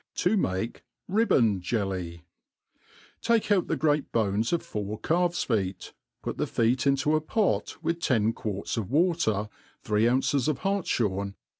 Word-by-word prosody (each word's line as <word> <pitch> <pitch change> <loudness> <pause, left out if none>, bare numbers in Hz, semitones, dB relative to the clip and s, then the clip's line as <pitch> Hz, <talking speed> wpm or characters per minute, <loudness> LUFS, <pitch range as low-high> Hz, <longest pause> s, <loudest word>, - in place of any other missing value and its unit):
7i 180 +5 +2
make 105 - -2 0.2
Ribbcnd 135 - +3
Jelly. 90 -4 -3 1.0
TAKE 230 -2 +1
out 190 -4 +3
the - - 0
great 150 0 +1
bones 110 0 +1
of 170 - 0
four 105 0 -4
calves 175 +1 +1
feet, 95 -6 -2 0.3
put - - -4
the - - 0
feet 125 +4 +1
into 140 +2 +2
a 155 - +1
pot 210 +6 0
with 170 0 -1
ten 115 -8 +2
quarts 105 -1 -4
of 105 -4 -3
water, 145 - +1 0.4
three 105 +2 +2
ounces 130 +2 +1
or 155 - +1
hartfhorc^ 110 - -1
120 Hz, 145 wpm, -27 LUFS, 105-165 Hz, 1.0 s, Ribbcnd